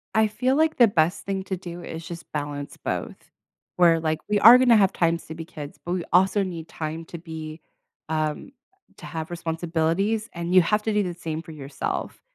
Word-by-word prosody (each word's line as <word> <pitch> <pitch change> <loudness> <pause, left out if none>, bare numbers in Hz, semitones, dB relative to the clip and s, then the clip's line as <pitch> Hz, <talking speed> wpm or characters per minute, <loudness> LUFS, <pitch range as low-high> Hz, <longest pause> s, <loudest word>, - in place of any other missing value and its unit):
I 220 0 +5
feel 255 +5 0
like 315 +1 +2
the 240 -2 +7
best 165 -3 +1
thing 195 -1 -2
to 190 -1 -3
do 175 -1 -8
is 165 +1 -7
just 170 0 -9
balance 145 -1 -5
both. - - -4 0.6
Where 170 -2 +5
like, 155 -1 -1
we 210 -1 +2
are 235 +3 +10
going 255 -1 +3
to 230 - +8
have 195 -3 +4
times 170 -1 0
to 160 - -7
be 165 0 -7
kids, 145 -3 -9
but 175 - -2
we 180 -2 -2
also 190 +3 +4
need 170 -3 -6
time 160 +1 -5
to 170 - -8
be, 160 -1 -8 0.5
um 155 - -2 0.5
to - - -11
have 160 0 -5
responsibilities 170 +6 -1
and 170 +1 -3
you 185 - +8
have 210 +4 +1
to 220 - -1
do 210 -1 +2
the 180 -1 -3
same 165 -2 -5
for 160 - -11
yourself, 140 -2 -5
170 Hz, 210 wpm, -24 LUFS, 160-195 Hz, 0.6 s, are